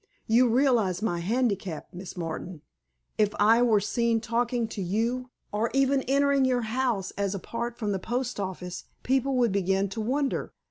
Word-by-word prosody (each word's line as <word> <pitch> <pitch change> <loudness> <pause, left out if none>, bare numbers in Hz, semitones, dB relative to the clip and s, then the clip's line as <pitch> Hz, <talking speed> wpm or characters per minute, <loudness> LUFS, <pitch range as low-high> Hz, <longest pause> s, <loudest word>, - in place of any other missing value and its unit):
You 240 +2 +4
realize 230 -7 +2
my 175 -6 0
handicap, 200 -4 -1
Miss 180 +1 -8
Martin? 165 -1 -5 0.6
If 210 -1 +2
I 225 +3 +5
were 225 -4 +4
seen 230 +3 +1
talking 235 +1 0
to 205 - -5
you, 230 +7 -1 0.2
or 215 +3 0
even 270 0 +3
entering 280 0 +3
your 255 -1 +2
house 225 -4 -1
as 200 0 0
apart 235 +4 -4
from 210 -4 -2
the 195 - -1
post 245 +3 -3
office, 185 -2 -5 0.2
people 265 +1 +1
would 240 -3 +3
begin 195 0 +1
to 220 +3 -4
wonder. 270 +5 -1
225 Hz, 160 wpm, -27 LUFS, 195-250 Hz, 0.6 s, I